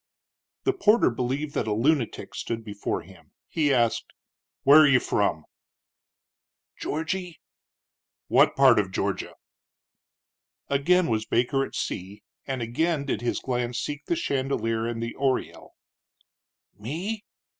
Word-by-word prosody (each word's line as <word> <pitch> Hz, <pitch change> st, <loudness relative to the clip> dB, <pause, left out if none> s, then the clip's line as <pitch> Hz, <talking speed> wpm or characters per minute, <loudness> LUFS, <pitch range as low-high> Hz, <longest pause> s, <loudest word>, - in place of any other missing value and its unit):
The 390 Hz, -, +2 dB
porter 230 Hz, -, +4 dB
believed 135 Hz, +5 st, -2 dB
that -, -, -1 dB
a 105 Hz, -, +1 dB
lunatic 125 Hz, +2 st, 0 dB
stood 115 Hz, -1 st, -4 dB
before 100 Hz, -1 st, -3 dB
him. -, -, -18 dB
He 150 Hz, -3 st, +1 dB
asked: 120 Hz, -3 st, +1 dB, 0.5 s
"Where 145 Hz, +3 st, +8 dB
are 155 Hz, -, +7 dB
you 130 Hz, -2 st, +5 dB
from?" 90 Hz, -10 st, 0 dB, 1.3 s
"Georgy." 170 Hz, +2 st, -3 dB, 0.9 s
"What -, -, +4 dB
part -, -, +6 dB
of -, -, -1 dB
Georgia?" -, -, -2 dB, 1.3 s
Again 170 Hz, +6 st, +3 dB
was 110 Hz, -4 st, -1 dB
Baker 125 Hz, +3 st, +1 dB
at -, -, -7 dB
sea, 100 Hz, +3 st, -5 dB, 0.2 s
and 130 Hz, -3 st, -2 dB
again 145 Hz, +6 st, 0 dB
did 135 Hz, -, -2 dB
his 120 Hz, -, -1 dB
glance 125 Hz, -2 st, -2 dB
seek 145 Hz, 0 st, -4 dB
the 340 Hz, -, 0 dB
chandelier 130 Hz, -, -1 dB
and 115 Hz, -1 st, -3 dB
the 115 Hz, -, -4 dB
oriel. 135 Hz, -2 st, -2 dB, 1.0 s
"Me?" 180 Hz, -, -4 dB
135 Hz, 125 wpm, -26 LUFS, 115-155 Hz, 1.3 s, Where